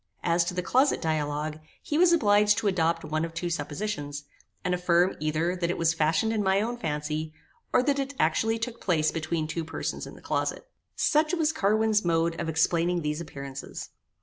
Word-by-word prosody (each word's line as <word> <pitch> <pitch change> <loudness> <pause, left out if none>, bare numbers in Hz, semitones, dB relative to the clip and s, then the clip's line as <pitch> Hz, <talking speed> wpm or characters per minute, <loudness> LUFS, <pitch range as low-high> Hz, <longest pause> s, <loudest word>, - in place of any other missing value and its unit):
As 170 0 +3
to 175 - -3
the 180 - -1
closet 260 +9 +3
dialogue, 150 -1 -2 0.2
he 300 - -2
was 355 -1 +6
obliged 210 -8 +4
to 225 - 0
adopt 165 -3 +1
one 155 +1 -1
of 165 0 -5
two 175 0 -2
suppositions, 145 -2 -3 0.4
and 180 - +1
affirm 180 +1 +2
either 155 +4 0
that 175 -2 -1
it 175 - -1
was 165 0 +2
fashioned 160 +7 +1
in 215 - 0
my 190 0 +3
own 230 +4 -1
fancy, 155 -4 -3 0.4
or 250 - +4
that 280 +1 +1
it 275 +1 -3
actually 220 +9 +2
took 230 +1 -5
place 160 -4 +2
between 160 0 -2
two 165 +1 -3
persons 160 - -4
in - - -10
the - - -13
closet. - - -2 0.3
Such 310 +3 +2
was 315 -2 +1
Carwin's 215 0 +2
mode 165 -1 +1
of 165 - -2
explaining 170 +2 +1
these 150 +2 -2
appearances. 140 -4 -7
170 Hz, 190 wpm, -27 LUFS, 155-210 Hz, 0.4 s, was